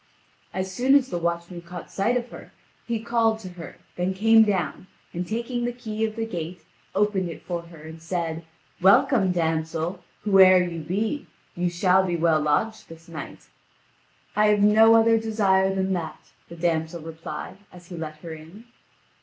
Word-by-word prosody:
As 190 0 -3
soon 260 +7 +3
as 270 -2 +3
the 175 - -2
watchman 170 +1 -3
caught 175 0 -10
sight 230 +6 +1
of 240 0 -5
her, - - -11 0.4
he 235 -2 -1
called 230 -2 +2
to 205 -4 -9
her, 175 -2 -10 0.2
then 180 +2 -1
came 225 +3 +6
down, 190 -2 -2 0.3
and 175 +1 -4
taking 235 +2 -3
the 240 - -1
key 220 -3 -5
of 215 -1 -5
the 225 -1 -2
gate, 175 -4 -6 0.3
opened 200 -4 +1
it 165 - -9
for 175 -2 -4
her 170 -2 -14
and 160 +1 -10
said: 165 -1 -3 0.4
"Welcome, 195 +1 +4
damsel, 160 0 -2 0.2
whoe'er 190 -3 +6
you 170 -2 -4
be. 210 - -2 0.3
You 175 0 0
shall 180 +2 +3
be 180 -2 -1
well 165 -2 +2
lodged 185 +9 -1
this 165 +1 -13
night." 165 -2 -9 0.9
"I 210 0 +4
have 210 -1 +3
no 220 +2 +6
other 225 0 +5
desire 195 -4 +2
than 190 0 -1
that," 165 -3 -6 0.2
the 170 - -9
damsel 165 -1 -1
replied, 165 +3 -7
as 175 -1 -15
he 180 - -7
let 155 -2 -6
her 165 -2 -6
in. 160 +8 -12
185 Hz, 175 wpm, -24 LUFS, 170-220 Hz, 0.9 s, came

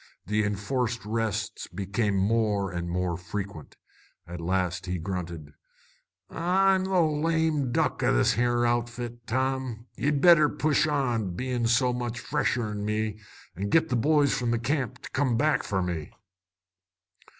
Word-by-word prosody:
The 105 +3 +1
enforced 110 +3 -2
rests 110 -1 -2
became 100 +3 -1
more 100 -1 +1
and 85 -1 -4
more 90 0 -1
frequent. 95 -2 -7 0.5
At 85 0 -7
last 90 +1 -1
he 90 0 -1
grunted 85 -3 -5 0.7
"I'm 190 +2 +2
the 190 -2 +2
lame 155 -3 +1
duck - - 0
o' - - +3
this - - +3
here 120 +1 +1
outfit, 120 0 -2
Tom. 130 -1 -1
Ye'd 145 0 0
better 155 -2 +6
push 150 +1 +1
on, 120 - 0
bein' 125 +1 -1
so 125 +2 +3
much 120 -1 -3
fresher'n 110 -6 -1
me, 105 0 -2 0.4
an' 100 +4 -3
git 160 +4 +3
the 125 - +1
boys 145 +3 +3
from 120 -1 -1
the 120 - +2
camp 130 0 -2
to - - -7
come 130 -4 +1
back 150 +4 +2
for 95 -2 -1
me." 85 -4 -4
115 Hz, 145 wpm, -27 LUFS, 100-135 Hz, 0.7 s, better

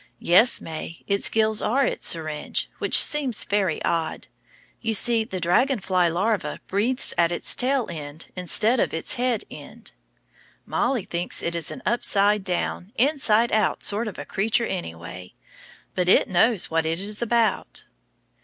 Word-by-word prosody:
Yes, 205 +8 +4
May, 160 0 -8
its 200 0 +1
gills 220 -1 +1
are 270 +5 +2
in - - 0
its - - -3
syringe, 155 -2 -1
which - - +4
seems 275 -7 +2
very 195 -6 0
odd, 165 -1 -2 0.5
you 225 -1 -1
see 230 +2 +3
the 190 -4 -6
dragon 240 +10 +2
fly 185 -2 +1
larva 175 -2 -1
breathes 235 +7 0
at 170 0 +3
its 175 - +1
tail 260 -1 +1
end 150 0 -8
instead 210 +7 +2
of - - 0
at - - -1
its - - -2
head 245 -2 0
end. - - -10 0.7
Mollie 245 -4 0
thinks 175 +1 -3
it 170 - -2
is 170 -2 -1
an 260 - -7
upside 210 -3 +2
down, 180 +1 -3
inside 240 -4 +2
out 215 -2 +1
sort 215 +3 -1
of 210 - -7
a - - -6
creature 225 +4 0
anyway. 90 - -7 0.6
But 180 -1 0
it - - +5
knows 190 +2 +2
what 160 0 +1
it 165 +1 -1
is 205 +3 -2
about. 230 -3 0
200 Hz, 165 wpm, -24 LUFS, 170-235 Hz, 0.7 s, it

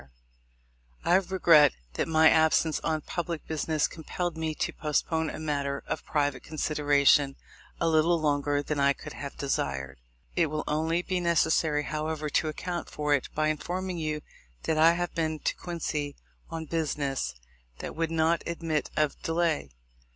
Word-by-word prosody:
— - - -31
I 175 - +3
regret 175 -6 +5 0.2
that - - -1
my 160 0 +5
absence 160 0 +4
on 155 -1 -1
public 170 0 -4
business 155 -1 0
compelled 170 +1 -4
me 160 -1 -2
to - - -2
postpone 160 +1 0
a - - -6
matter 140 -3 -2
of 145 - -3
private 145 -3 0
consideration 145 -2 +3 0.4
a - - +1
little 165 +1 +3
longer 145 -1 +1
than 150 0 -2
I 140 0 +4
could - - -9
have 140 -1 -7
desired. 70 - -2 0.4
It 170 -2 +3
will 155 +1 -3
only 160 +3 0
be 185 0 -1
necessary, 160 -3 +2
however, 155 0 -3
to 155 - +2
account 175 +3 -4
for 150 -1 0
it 140 - 0
by 155 0 +2
informing 180 +3 -3
you 155 -1 -2 0.4
that 155 -1 0
I 165 +2 +7
have 175 0 -2
been 160 -1 -1
to - - -1
Quincy 150 -4 -3 0.3
on 160 -1 -5
business 145 - -2 0.4
that - - -6
would 165 0 0
not 165 0 +2
admit 165 -3 -2
of 150 -2 +1
delay. 165 - 0
155 Hz, 160 wpm, -28 LUFS, 145-165 Hz, 0.4 s, I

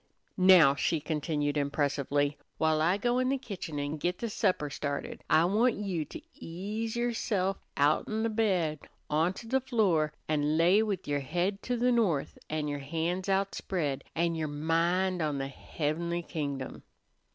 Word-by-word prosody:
"Now," 180 -6 +8
she 155 +3 0
continued 150 -1 -1
impressively, 145 0 0 0.2
"while 160 -1 +2
I 175 +5 +3
go 240 +4 +1
in 255 0 +1
the 275 - +1
kitchen 190 - -6
an' 145 +2 -2
git 175 +4 -1
the 230 -2 -4
supper 180 -6 +1
started, 140 0 -4
I 160 - +5
want 220 +6 +3
you 190 -6 -2
to 325 - -8
ease 210 +7 -5
yerse'f 220 -5 0 0.2
outen 155 +10 +2
the 230 - +1
bed 185 -9 +1 0.3
on 160 +4 +2
to 225 - -10
the 265 +3 +1
floor, 200 - +2 0.2
an' 150 0 +1
lay 180 +6 +5
with 200 -4 -2
yer 145 -1 0
head 175 +8 -1
to 245 0 -2
the 250 +1 +3
north 205 - +1
an' 155 -1 -1
your 145 -1 -3
han's 165 +6 -2
outspread, 190 -6 -1
an' 170 +1 +1
yer 160 -1 -2
mind 170 +5 +1
on 150 -2 0
the 135 0 -3
heabenly 170 +5 -3
kingdom." 140 -5 -4
170 Hz, 165 wpm, -30 LUFS, 150-200 Hz, 0.3 s, Now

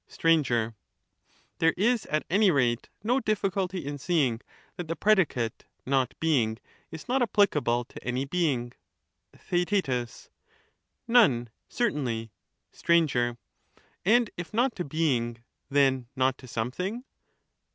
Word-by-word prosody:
Str. 165 - -1 1.3
There 165 0 +3
is 230 +3 +1
at 155 0 -1
any 200 +3 +4
rate 125 -6 +1
no 245 +5 +2
difficulty 195 - -1
in 145 0 -5
seeing 135 -8 +1 0.3
that 175 - -6
the 165 - -1
Certainly - - -10
predicate 165 - +1 0.2
'not 130 -2 +1
being* 125 -9 +1 0.3
is 160 -1 -9
not 260 +2 +1
applicable 150 - +2
to - - -12
any 125 +2 -1
being. 135 -7 -1 0.6
not - - -22
of - - -14
any 175 0 +4
Theaet. 130 - -2 0.8
None, 135 - +4 0.2
certainly. 125 - -1 0.4
Str. 170 - 0 1.1
And 230 +3 +3
if 175 -2 -6
not 240 +3 +1
to 180 - -2
being, 125 -7 -1 0.3
then 135 -3 +2
not 130 0 +2
to 130 - -12
something. 180 - -3
155 Hz, 130 wpm, -27 LUFS, 125-195 Hz, 1.3 s, any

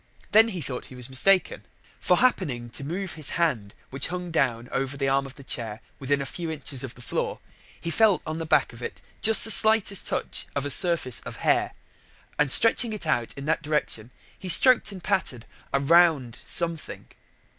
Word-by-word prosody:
Then 220 +2 +6
he 185 -6 -6
thought 125 -4 -6
he 130 - -14
was 125 +1 -7
mistaken: 185 - +1 0.4
for 180 - +1
happening 125 - -1
to 140 - -3
move 180 +5 -5
his 155 -3 -1
hand 130 -13 -2 0.2
which 135 0 0
hung 180 0 -6
down 120 -7 -1
over 135 +1 -3
the 135 -1 -2
arm 135 0 0
of 135 - -13
the 140 - -14
chair 115 -4 -6 0.2
within 140 +1 -1
a - - -8
few 165 +5 -7
inches 145 -4 -4
of 130 -3 -8
the 125 - -15
floor, - - -4 0.4
he 170 - -5
felt 215 0 +2
on 155 +1 -5
the 165 - -6
back 145 -5 +1
of 115 - -13
it - - -7 0.2
just 220 0 +7
the 220 - +6
slightest 220 -4 +3
touch - - -3
of 140 0 -2
a 145 - +1
surface 170 - +4
of - - -9
hair, - - +1 0.7
and 150 -2 +2
stretching 230 - +5
it 210 - -6
out 120 -7 -2
in 140 - -7
that 160 +2 -1
direction 145 -7 -3 0.3
he 185 - -7
stroked 245 +6 +5
and 185 -3 -11
patted 135 - -2 0.3
a 140 - 0
rounded 145 -5 +2
something. 170 -2 -1
150 Hz, 200 wpm, -24 LUFS, 130-180 Hz, 0.7 s, just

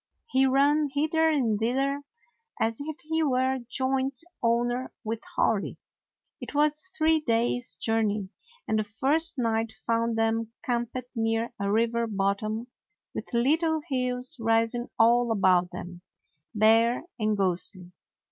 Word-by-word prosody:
He 265 0 +4
ran 285 +3 +3
hither 315 +3 +2
and 240 -9 +1
thither, 270 +5 0 0.6
as 225 0 0
if 310 +1 -5
he 320 +1 0
were 260 -2 +1
joint 265 +2 0 0.2
owner 240 +2 0
with 225 +1 -3
Hori. 210 -3 +1 0.6
It - - -7
was 300 +1 +4
a 375 +5 -13
three 320 -1 +4
days' 240 -2 0
jour 225 0 0
ney, 205 -2 -1 0.4
and 220 - +1
the - - +1
first 280 +10 +1
night 225 -2 0
found 230 0 0
them 225 0 0
camped 240 0 -1 0.2
near 225 0 -1
a 200 0 -1
river 230 +1 +1
bottom, 210 +2 -1 0.5
with - - -6
little 315 +7 +2
hills 250 +1 -1
rising 225 +2 +1
all 235 +1 +4
about 185 -4 +3
them, 175 0 -8 0.5
bare 225 +4 +4 0.2
and 215 -1 +1
ghostly. 185 -1 -1
235 Hz, 135 wpm, -27 LUFS, 225-270 Hz, 0.6 s, He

